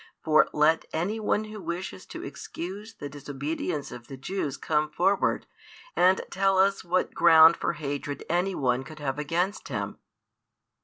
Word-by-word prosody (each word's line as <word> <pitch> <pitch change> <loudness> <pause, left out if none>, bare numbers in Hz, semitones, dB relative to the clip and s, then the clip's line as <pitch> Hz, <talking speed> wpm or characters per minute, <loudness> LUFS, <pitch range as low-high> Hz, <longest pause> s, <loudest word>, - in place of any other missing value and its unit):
For 155 -1 +4
let 155 +2 +3
any 190 +8 -1
one 215 0 +1
who 215 -1 -8
wishes 170 - -5
to - - -8
excuse 200 +6 -7
the 145 - -6
disobedience 145 +2 -4
of 120 -1 -10
the 135 - -8
Jews 145 -1 -3
come 155 -1 0
forward 190 +5 +1 0.5
and 185 +1 +4
tell 195 0 +2
us 195 +1 +3
what 180 +1 0
ground 165 -1 +7
for - - -1
hatred 145 -1 -4
any 180 +3 0
one 125 -1 +1
could 155 +3 -11
have 145 -1 -3
against 175 +7 -1
Him. - - -4
165 Hz, 155 wpm, -27 LUFS, 145-190 Hz, 0.5 s, ground